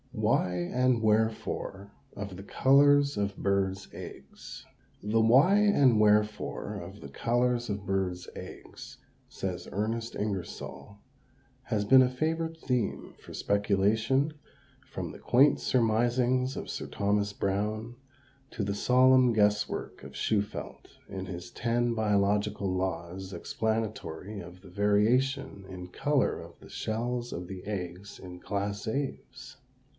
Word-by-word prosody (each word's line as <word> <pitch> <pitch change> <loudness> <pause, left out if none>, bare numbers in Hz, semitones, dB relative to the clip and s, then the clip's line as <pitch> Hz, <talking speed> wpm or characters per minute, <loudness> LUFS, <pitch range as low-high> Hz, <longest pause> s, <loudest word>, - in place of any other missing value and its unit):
WHY 90 - +1
AND 120 +7 +1
WHEREFORE 110 -2 0 0.2
OF 100 -2 -6
THE 95 - -9
COLORS 140 +4 +4
OF 100 -1 -1
BIRDS' 95 -1 0
EGGS. - - -10 0.4
The 110 +2 +1
why 135 - +6
and 145 - +4
wherefore 105 0 +1
of - - -10
the - - -8
colors 120 - 0
of 100 -1 -3
birds' 95 -2 -1
eggs, - - -10 0.3
says 90 -2 -5
Ernest 115 +3 -2
Ingersoll, 100 0 -5 0.7
has 110 -4 -1
been 130 +4 +8
a 125 - +2
favorite 160 +5 -2
theme 125 -8 -2
for - - -12
speculation, 110 +8 +1 0.5
from - - -5
the - - -11
quaint 135 +4 +4
surmisings 120 +2 +2
of - - -6
Sir - - -4
Thomas 100 0 0
Browne 105 +4 -2 0.6
to 105 - -3
the 100 0 -2
solemn 130 +2 +5
guess 105 -1 +3
work - - -6
of - - -10
Shufeldt, 105 -1 -2 0.2
in 95 -1 -5
his 90 -1 -7
ten 120 0 0
"biological 105 -2 +1
laws 95 0 -3
explanatory 105 -1 -3
of 90 0 -11
the 95 - -14
variation 105 +5 +1
in 90 -1 -7
color 145 +8 +1
of - - -13
the - - -15
shells 120 +2 -3
of 90 +1 -5
the 95 -1 -8
eggs 95 -1 -5
in 90 -1 -10
class 100 +2 -3
Aves." 130 +1 -5
105 Hz, 130 wpm, -29 LUFS, 100-125 Hz, 0.7 s, been